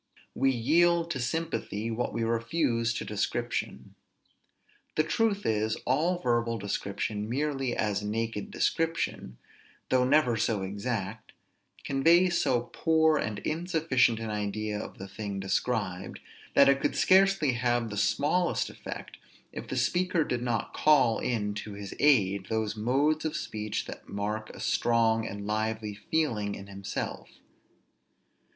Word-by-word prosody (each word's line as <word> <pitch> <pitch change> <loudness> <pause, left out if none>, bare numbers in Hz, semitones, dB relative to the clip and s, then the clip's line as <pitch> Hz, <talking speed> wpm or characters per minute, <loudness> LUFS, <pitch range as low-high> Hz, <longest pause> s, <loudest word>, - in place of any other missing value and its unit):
We 135 - +2
yield 170 +7 +3
to 135 - -2
sympathy 120 -6 -2
what 115 +2 -2
we 115 - -2
refuse 115 +1 0
to - - -3
description. 120 +3 -3 1.0
The 155 - +3
truth 205 +5 0
is, 110 0 +1
all 160 +8 +2
verbal 120 -6 0
description, 105 +1 -3
merely 135 -1 -1
as 105 -1 0
naked 115 - -3
description, 165 - -1 0.5
though 130 -1 +3
never 130 -3 +3
so 105 -2 0
exact, 105 +1 -4 0.5
conveys 170 +6 +4
so 120 -2 +2
poor 160 -1 +3
and 105 -6 -2
insufficient 155 -8 +1
an 110 -1 -4
idea 105 0 -2
of - - -8
the 95 - -7
thing 100 0 -5
described, 95 -1 -2 0.4
that 140 - +7
it 140 0 +4
could - - 0
scarcely 190 -6 +4
have 120 -1 0
the - - -4
smallest 155 - +1
effect, - - -8 0.3
if - - -7
the - - -3
speaker 180 -2 +1
did 125 -4 -2
not 120 -3 -2
call 130 -7 +4
in 105 -4 -1
to 105 0 -6
his 100 -1 -7
aid 100 -10 +3
those 110 -1 -1
modes 140 +8 +1
of 155 0 -2
speech 105 -7 -3
that - - -10
mark 105 +2 -3
a - - -11
strong 115 -1 +2
and 100 0 -6
lively 110 0 -2
feeling 105 -4 -1
in 100 - -9
himself. 100 0 -5
115 Hz, 135 wpm, -29 LUFS, 105-150 Hz, 1.0 s, that